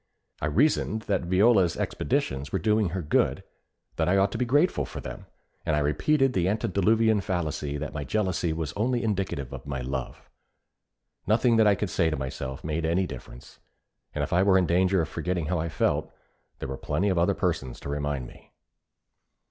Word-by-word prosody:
I 75 - 0
reasoned 110 - +1
that 95 -4 -1
Viola's 95 -1 +4
expeditions 70 +3 -1
were - - +1
doing 105 +1 +2
her 90 +1 -3
good, 75 - +1 0.5
that - - +1
I 95 - +4
ought 100 0 +3
to 115 - -4
be 125 - +1
grateful 145 +9 +2
for - - -7
them, - - -8 0.4
and 75 - +1
I - - +2
repeated 130 - +2
the 90 -3 +1
antediluvian 110 +1 +2
fallacy 75 -6 -2
that 75 +1 -5
my 75 -1 -3
jealousy 90 +1 0
was 80 -2 -3
only 120 +4 0
indicative 95 - -2
of 65 +1 -8
my 65 -3 -3
love. 65 0 -5 1.0
Nothing 115 +2 +3
that 110 -1 +5
I 100 - +5
could 100 -1 -3
say 85 -3 +2
to 75 - -2
myself 65 0 -5
made 80 +1 -2
any 85 +4 +1
difference; 60 -4 -10 0.6
and - - 0
if - - -3
I 90 - +4
were 95 -1 +5
in 95 - +3
danger 90 +1 +2
of - - -4
forgetting 85 +1 -2
how 85 +2 -1
I 85 +1 -2
felt, - - 0 0.5
there - - -5
were 65 - -4
plenty 100 +3 0
of 90 -3 +1
other 85 - +2
persons 65 -2 -2
to - - -6
remind 70 -2 -2
me. - - -16
90 Hz, 190 wpm, -27 LUFS, 75-105 Hz, 1.0 s, that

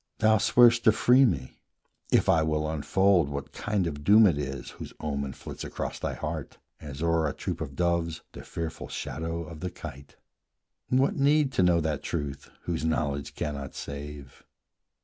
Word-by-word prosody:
Thou 110 0 +4
swear'st 120 +2 +5
to 110 - +8
free 125 +5 +5
me, 65 - -2 0.5
if - - +4
I 80 - +4
will 75 -1 0
unfold 85 +2 +2
What 70 0 -5
kind 105 -3 -1
of 75 -3 -4
doom 105 +6 +7
it 90 - +4
is 70 -1 -5
whose - - -9
omen 70 -3 -3
flits - - -8
Across - - -5
thy - - -3
heart, - - -5 0.2
as 75 0 -7
o'er 85 -1 +2
a - - -4
troop - - -5
of 70 - -5
doves 85 0 0
The - - -9
fearful 80 -1 -5
shadow 80 +1 -4
of 80 -1 -10
the 90 - -3
kite. 70 -4 -10 0.7
What 130 +2 +2
need 145 0 +3
To 130 - +1
know 90 -2 +4
that 75 -2 -2
truth 70 -1 -4
whose 85 -3 -2
knowledge 70 -3 -1
cannot 70 -3 -4
save? 70 -1 -8
80 Hz, 170 wpm, -28 LUFS, 70-95 Hz, 0.7 s, to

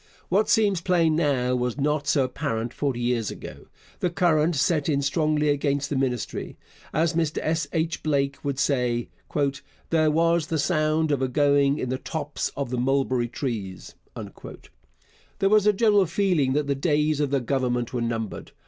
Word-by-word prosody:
What 200 +4 +2
seems 200 -5 +3
plain 165 -3 +2
now 135 -6 +1
was 125 0 -2
not 145 0 0
so 140 -1 +3
apparent 120 -2 -3
forty 135 -4 -2
years 120 -2 0
ago. - - -9 0.3
The 180 - 0
current 170 -2 +2
set 150 +2 +1
in 140 -2 +1
strongly 150 +1 +1
against 140 0 0
the - - 0
Ministry. 130 -3 -2 0.3
As 160 +2 +1
Mr 160 -2 -1
S. 165 +1 0
H. 160 -1 -1
Blake 140 -2 -1
would 140 -2 -2
say, 125 -4 0 0.8
'There 155 -1 +3
was 165 +1 +2
the 165 - -1
sound 155 0 +1
of 140 -2 0
a 130 - +1
going 140 +1 +3
in 130 - -3
the 130 0 -2
tops 150 -2 -3
of 140 -3 -3
the 125 - -1
mulberry 130 -1 +1
trees.' 110 -7 -5 1.4
There 195 - +2
was 210 0 +4
a - - +7
general 205 -2 +3
feeling 165 -7 +1
that 150 +1 +1
the 140 - 0
days 150 +1 +1
of 145 -2 +1
the 140 0 +1
Government 125 -1 -1
were 120 - -1
numbered. 115 -2 -4
145 Hz, 170 wpm, -25 LUFS, 130-160 Hz, 1.4 s, a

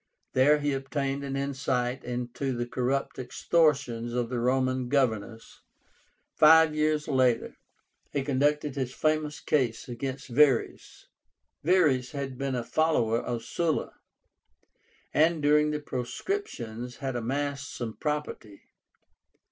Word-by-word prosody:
There 140 +4 +5
he 145 -1 -1
obtained 135 +1 -2
an 135 -1 -4
insight 135 -2 -1
into 125 +2 -3
the 120 - -1
corrupt 130 +3 -2
extortions 130 -4 +1
of 120 -1 -1
the 125 -1 -2
Roman 130 0 0
governors. 115 -5 -1 0.7
Five 160 0 +6
years 155 0 0
later, 130 -4 +1 0.6
he 140 - -1
conducted 145 +1 +1
his 130 -2 -3
famous 155 -1 0
case 125 -7 0
against 130 +2 -5
Verres. 135 -1 +1 0.6
VERRES 150 -7 +3
had 140 -2 -4
been 135 0 -2
a 120 - -2
follower 120 -7 +1
of 120 -2 -4
Sulla, 165 +5 -1 1.2
and 160 +2 +3
during 150 +1 +3
the 150 0 -2
proscriptions 125 - -4
had 135 -2 -4
amassed 140 +4 -2
some 115 -3 -5
property. 150 -9 -4
135 Hz, 115 wpm, -28 LUFS, 125-150 Hz, 1.2 s, Five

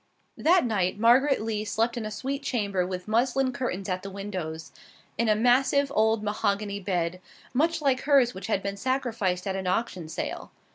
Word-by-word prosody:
That 345 -1 +4
night 200 -5 0
Margaret 245 +3 +4
Lee 215 -1 -2
slept 225 +3 0
in 225 -3 -3
a - - -4
sweet 270 +6 -4
chamber 200 -9 -1
with 180 0 -5
muslin 255 +4 +1
curtains 195 -8 -3
at 185 -1 -2
the 195 - -7
windows, 185 -5 -6 0.4
in 230 -1 +1
a 215 - +5
massive 265 +5 +3
old 220 -2 +2
mahogany 205 -1 -1
bed, 180 -2 -2 0.3
much 315 +4 +1
like 265 -2 +2
hers 275 -4 +4
which 190 0 -7
had 200 -3 0
been 200 0 -3
sacrificed 225 -7 -1
at 190 -1 -2
an 190 -1 -3
auction 180 -4 -2
sale. - - -5
215 Hz, 180 wpm, -27 LUFS, 190-255 Hz, 0.4 s, a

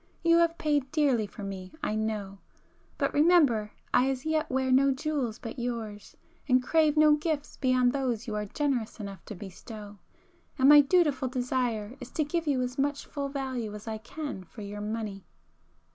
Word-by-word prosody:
You 335 0 +5
have 335 0 +3
paid 290 -3 0
dearly 270 -9 +2
for 205 - -10
me 190 -2 -6
I - - 0
know;—but 215 -3 -5
remember 290 -9 +4 0.2
I 260 +2 +4
as 265 0 -3
yet 315 -1 0
wear 260 0 0
no 270 +2 +5
jewels 270 -4 -1
but 230 +1 -7
yours, 230 -4 -5 0.3
and 255 0 +4
crave 310 +1 +3
no 305 0 +7
gifts 300 -1 -3
beyond 255 -1 +2
those 250 -4 -1
you 220 - -4
are 210 0 -2
generous 255 -3 -2
enough 200 -2 -7
to 210 - -7
bestow,—and 205 - -6
my 295 0 +10
dutiful 290 -3 +2
desire 245 -3 -2
is 250 -2 -8
to 310 - +1
give 330 +2 -2
you 265 -3 +2
as 250 +2 -4
much 285 +1 0
full 280 -2 -4
value 260 -6 -4
as 210 +2 -10
I 220 -1 -3
can 280 -3 -6
for 210 +4 -11
your 205 +1 -6
money." 210 -2 -4
255 Hz, 175 wpm, -29 LUFS, 215-290 Hz, 0.3 s, my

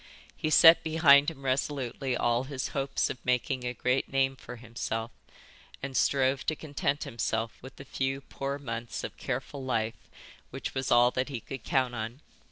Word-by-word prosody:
He 155 - -2
set 165 +2 +8
behind 155 -3 +5
him 140 -4 -11
resolutely 130 -1 -1
all 120 +2 +1
his 135 -2 -4
hopes 135 -1 -1
of 125 - -9
making 125 +1 0
a 125 0 -2
great 125 +3 0
name 135 0 +2
for 125 -1 -10
himself 115 -1 -4 0.7
and 135 -1 -4
strove 135 0 +2
to 155 - +1
content 145 -1 -2
himself 115 -4 -3
with 130 0 -11
the 135 - -11
few 135 +1 -2
poor 140 0 -4
months 115 -4 -5
of - - -6
careful 135 +1 -4
life 115 -3 -2 0.4
which - - -5
was 130 -1 -2
all 120 +1 +6
that 130 +3 -1
he 130 -4 -4
could 130 +2 -8
count 130 -2 +1
on. 115 +4 -5
130 Hz, 175 wpm, -29 LUFS, 120-140 Hz, 0.7 s, set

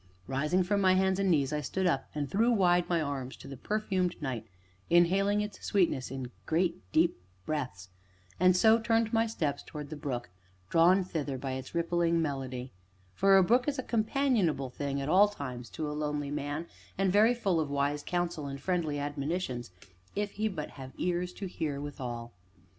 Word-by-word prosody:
Rising 150 - +1
from 200 +2 +1
my 185 -1 +5
hands 190 0 +2
and 195 -1 +2
knees, 145 -4 +2
I 150 - 0
stood 190 +5 -2
up 140 -7 +1
and 145 -1 -1
threw 225 - +2
wide 180 -5 +3
my 170 -1 +2
arms 135 -3 -4
to - - -12
the 135 - -7
perfumed 185 - -1
night, 125 -6 -4 0.4
inhaling 195 +4 +4
its 210 0 -6
sweetness 170 -10 +1
in 130 -1 -5 0.2
great, 170 +1 +1
deep 165 - +3 0.3
breaths, 125 -12 -3 0.5
and 185 0 +5
so 220 +4 +6
turned 225 -1 +1
my 225 0 +3
steps 150 -10 -2
towards 150 -1 -8
the - - -4
brook, 125 -7 -4 0.4
drawn 180 +3 +5
thither 150 -6 -3
by 135 +1 -4
its 130 +4 -6
rippling 170 0 +2
melody; 130 -4 -3 0.4
for 195 0 +5
a 190 - +6
brook 245 +7 +3
is 290 -1 0
a 260 - -2
companionable 220 - +1
thing, 140 +1 -3
at 135 - -3
all 190 +6 +6
times, 125 - -6
to 150 +11 -4
a 150 - -3
lonely 150 -1 -2
man, 145 +2 -3 0.3
and 195 -1 +2
very 220 +4 +5
full 195 -8 +1
of 155 -3 -1
wise 140 +1 0
counsel 175 -2 -2
and 140 0 -5
friendly 160 -2 -1
admonitions, 145 -3 -3 0.5
if 205 0 -1
he 215 +2 -1
but 165 -8 -5
have 130 -1 -10
ears 180 0 -1
to 195 - -7
hear 155 -6 -3
withal. 120 -5 -6
165 Hz, 185 wpm, -30 LUFS, 140-190 Hz, 0.5 s, so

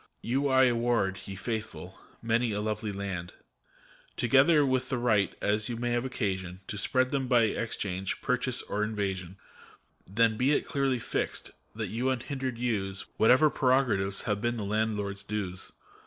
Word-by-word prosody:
You 135 +4 +1
I 130 -1 +5
award, 115 -6 +2
ye 100 - -6
Faithful, 110 +3 -5 0.2
many 115 +1 +1
a 105 - -1
lovely 105 0 -2
land. 95 -3 -5 0.8
Together 140 +5 +5
with 130 -1 0
the 130 - 0
right, 110 -5 +2
as 105 +2 +1
you 120 - -3
may 120 +1 -1
have 120 +1 0
occasion, 95 -7 -3
To 105 - -4
spread 130 +4 +1
them 135 -2 0
by 120 -2 +5
exchange, 100 -4 -2
or - - -12
purchase, 125 -1 0
or 105 +1 -2
invasion: 95 -4 -3 0.7
Then 110 +2 +2
be 130 +5 +3
it - - +1
clearly 135 -2 0
fixed, 115 - -3 0.2
that - - -3
you 120 +4 -1
unhindered 130 0 -3
use 100 -6 -2
Whatever 130 +7 +5
prerogatives 125 -8 +2
have 105 -2 -1
been 120 0 0
the 110 - -3
landlord's 105 -1 -1
dues. 100 -3 -4
115 Hz, 160 wpm, -29 LUFS, 100-125 Hz, 0.8 s, I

